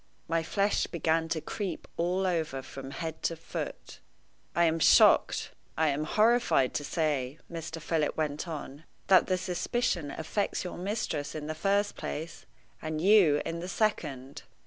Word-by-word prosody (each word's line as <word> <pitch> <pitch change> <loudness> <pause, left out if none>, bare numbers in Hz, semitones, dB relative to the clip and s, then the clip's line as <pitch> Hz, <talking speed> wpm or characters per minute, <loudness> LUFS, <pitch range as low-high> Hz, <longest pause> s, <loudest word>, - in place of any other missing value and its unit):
My 165 0 +1
flesh 200 +5 +1
began 165 -1 0
to 165 - 0
creep 185 +2 -5
all 180 +3 0
over 160 -7 -1
from 135 0 -8
head 160 +2 -5
to 165 - 0
foot. 165 - -7 0.6
"I 170 - +4
am 165 -1 +2
shocked - - +5 0.3
I 160 -1 +3
am 145 +2 -1
horrified 220 - +3
to 145 - -2
say," 145 -3 -1
Mr. 165 -1 -5
Philip 155 -1 -1
went 150 +1 -2
on, 155 -1 -7 0.2
"that 190 -1 +6
the 185 - +1
suspicion 180 -2 -1
affects 180 +10 -2
your 180 -1 -6
mistress 185 -7 -3
in 150 -1 -5
the 155 - -3
first 200 +5 +1
place, 160 +2 -6 0.3
and 155 0 -3
you 180 -5 +5
in 165 0 -3
the 180 +2 -5
second." 145 - -2
165 Hz, 155 wpm, -29 LUFS, 150-185 Hz, 0.6 s, that